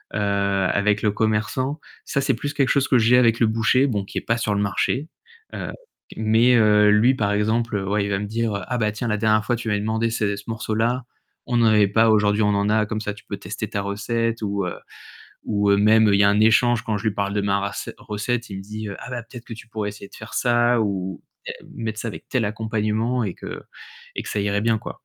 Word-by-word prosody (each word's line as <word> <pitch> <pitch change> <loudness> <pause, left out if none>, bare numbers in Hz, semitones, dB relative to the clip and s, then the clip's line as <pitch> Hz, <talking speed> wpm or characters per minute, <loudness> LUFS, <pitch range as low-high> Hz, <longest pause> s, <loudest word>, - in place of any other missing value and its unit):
heu, - - 0
avec 100 0 +1
le 105 - +3
commerçant, 110 +7 -1 0.3
ça - - -1
c'est 135 - +1
plus 145 +5 -4
quelque 135 -2 +1
chose 140 0 +2
que 130 - +5
j'ai 120 +3 +5
avec 115 -2 +4
le 115 - +4
boucher, 115 +5 +2
bon, 105 -6 -1
qui - - -8
est - - -12
pas 115 +1 0
sur 110 -3 -1
le 100 - 0
marché. 105 +9 -1 0.5
Heu - - -5 0.5
mais 115 +3 +4
heu, 105 -2 +5
lui 115 +5 +4
par 105 -4 0
exemple, 110 +1 0
ouais, 105 0 +1
il - - -3
va 100 - +1
me 105 - -3
dire: 110 +1 -2
«Ah 125 -1 -2
bah 105 -1 +1
tiens 115 +3 -4
la 105 - 0
dernière 110 0 +2
fois 120 - +1
tu 115 0 -6
m'as 105 - +1
demandé 110 +2 0
ces 100 -3 -1
ce 100 - -9
morceau-là, 115 +2 -1 0.4
on 120 -1 +1
n'avait 110 -3 +4
pas. 110 +3 +3
Aujourd'hui 105 0 +3
on - - +3
en 100 0 +1
a, 110 0 +2
comme 110 -1 -3
ça, 105 -1 -3
tu 105 - -15
peux - - -5
tester - - -6
ta 100 - -2
recette» 115 +3 -2
ou, 100 -2 -1
heu, - - -4 0.7
ou 100 -1 +1
heu, 100 - +5
même 110 +1 +5
il 100 - +4
y - - +6
a 100 - +5
un 105 +1 +2
échange 115 +1 +4
quand 110 -2 -1
je 110 - -10
lui 105 - -3
parle 100 -1 -2
de 105 - 0
ma 100 0 +1
ras 100 -1 -4
recette, 115 +3 -3
il 95 - -5
me 95 - -7
dit: 105 +1 -6
«Ah 130 - -9
bah 120 -1 -4
peut-être 115 +1 -12
que - - -9
tu 115 - -13
pourrais 105 -2 -3
essayer 100 -1 -11
de - - -15
faire 110 +2 -10
ça 120 -1 +2
ou 95 -3 -3 0.5
mettre 110 -2 -4
ça 115 - -3
avec 105 - -9
tel 130 -4 +1
accompagnement 110 +2 -1
et 95 - -4
que - - -8 0.5
et - - -2
que - - -9
ça 105 - -1
irait 100 +1 0
bien» 115 -1 +2
quoi. - - -9
110 Hz, 245 wpm, -22 LUFS, 105-115 Hz, 0.7 s, y